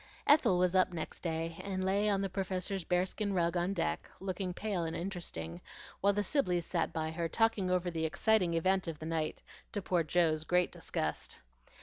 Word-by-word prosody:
Ethel 285 -11 +5
was 180 0 +2
up 185 -1 +4
next 165 -3 -5
day, 165 -1 -3
and 190 -1 -2
lay 200 +3 +2
on 195 -1 +2
the 195 - 0
Professor's 190 0 -2
bearskin 190 +4 0
rug 170 -1 +1
on 175 +2 +1
deck, 80 - -2
looking 185 -1 -3
pale 195 -1 -2
and 165 0 -3
interesting, 165 - -5 0.4
while 200 - +4
the 205 +1 0
Sibleys 180 - +1
sat - - 0
by 160 0 -2
her 165 0 -2
talking 225 -2 +2
over 180 -1 +1
the 160 -1 -1
exciting 180 0 +2
event 185 +2 +2
of 165 -2 -4
the 155 - -7
night, 160 -1 -2 0.3
to 205 - -1
poor 180 -2 +2
Joe's 160 -1 +2
great 180 +2 +2
disgust. 75 0 -3
180 Hz, 190 wpm, -33 LUFS, 165-195 Hz, 0.4 s, Ethel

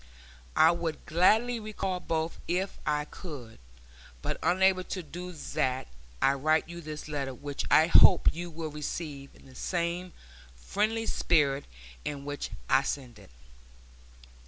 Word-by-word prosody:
I 160 - +7
would 170 -2 -3
gladly 220 +8 +3
recall 195 -4 -3
both 165 -1 -2
if 185 +3 -1
I 150 -1 +1
could, 145 -9 -9 0.6
but - - -2
unable 185 +1 +3
to 185 - -4
do 175 +4 -7
that 130 - -2 0.3
I 135 - +4
write 155 +4 +2
you 170 +1 -8
this 155 -1 -7
letter 140 -3 -3
which 145 +2 -5
I 155 - +7
hope 170 - +7
you 175 +1 -5
will 160 -1 -5
receive 145 -1 -5
in - - -19
the 130 - -15
same 175 +4 -2 0.4
friendly 215 - -1
spirit 145 -9 +2 0.4
in 140 -1 -5
which 145 0 -4 0.2
I 135 - +5
send 130 -4 -4
it. - - -16
160 Hz, 140 wpm, -29 LUFS, 145-180 Hz, 0.6 s, I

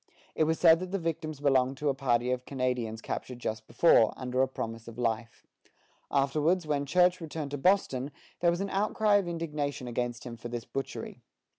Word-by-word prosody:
It 155 - +2
was 160 +1 0
said 165 -1 +7
that 185 0 -5
the 195 - -1
victims 160 -4 -4
belonged 135 -2 +2
to 150 0 0
a - - +2
party 125 -2 +1
of 125 0 -2
Canadians 125 -4 -2
captured 125 - -5
just 110 -2 -4
before, 115 -2 +4
under 130 0 -1
a 130 - +3
promise 115 -3 -6
of 115 - -10
life. 115 -1 -2 0.6
Afterwards, 150 +5 +2
when 145 -2 -1
Church 180 +3 +3
returned 155 -3 -5
to 145 - -3
Boston, 140 -7 +2 0.3
there 175 - +4
was 175 +2 0
an 200 - -2
outcry 210 +1 +2
of 195 -3 -1
indignation 150 -6 -3
against 120 0 -3
him 120 -2 -7
for 115 - -7
this 120 -1 -5
butchery. 135 - -5
140 Hz, 190 wpm, -29 LUFS, 125-165 Hz, 0.6 s, said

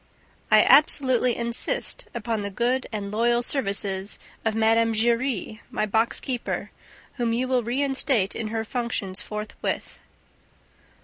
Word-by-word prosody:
I - - +7
absolutely 260 -5 +4
insist 240 - -1
upon 225 -1 -2
the 200 - -3
good 245 +5 0
and 205 -2 -4
loyal 235 +2 +2
services 200 -6 -1 0.3
of 220 -1 0
Mme. 225 +1 +3
Giry, 230 -1 0
my - - -1
box 220 +2 +1
keeper, 250 -3 -3 0.5
whom 235 -2 0
you 250 +2 0
will 255 -1 +2
reinstate 260 -3 0
in 230 - -3
her 220 +1 -2
functions 220 -5 -3
forthwith. 210 0 -5
230 Hz, 125 wpm, -25 LUFS, 215-250 Hz, 0.5 s, I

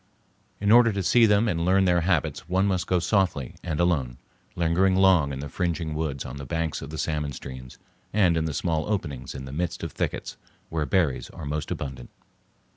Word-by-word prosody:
In 100 +1 +2
order 120 0 +7
to 100 -1 -2
see 115 +5 +5
them 105 +2 +3
and 85 -5 0
learn 95 +2 +3
their 90 -1 +3
habits 80 -3 -1
one 95 +2 +2
must 95 -3 0
go 90 - +2
softly 90 - 0
and 80 -4 -3
alone, 70 -9 +1 0.4
lingering 85 +3 +2
long 95 -7 +4
in 70 0 -5
the 75 - -5
fringing 85 0 -2
woods 75 -3 -3
on 65 +2 -7
the 70 - -7
banks 80 +1 -2
of 70 - -7
the 80 - -6
salmon 75 -2 -2
streams, 65 -2 -9 0.3
and 95 -5 +3
in 80 -1 0
the 80 - -2
small 80 -3 -1
openings 70 -11 -3
in 65 - -6
the 65 - -8
midst 85 +2 -3
of - - -4
thickets - - -3 0.3
where 80 -3 -2
berries 80 -5 +1
are 80 - -9
most 75 +1 -3
abundant. 65 -3 -5
80 Hz, 200 wpm, -26 LUFS, 70-95 Hz, 0.4 s, order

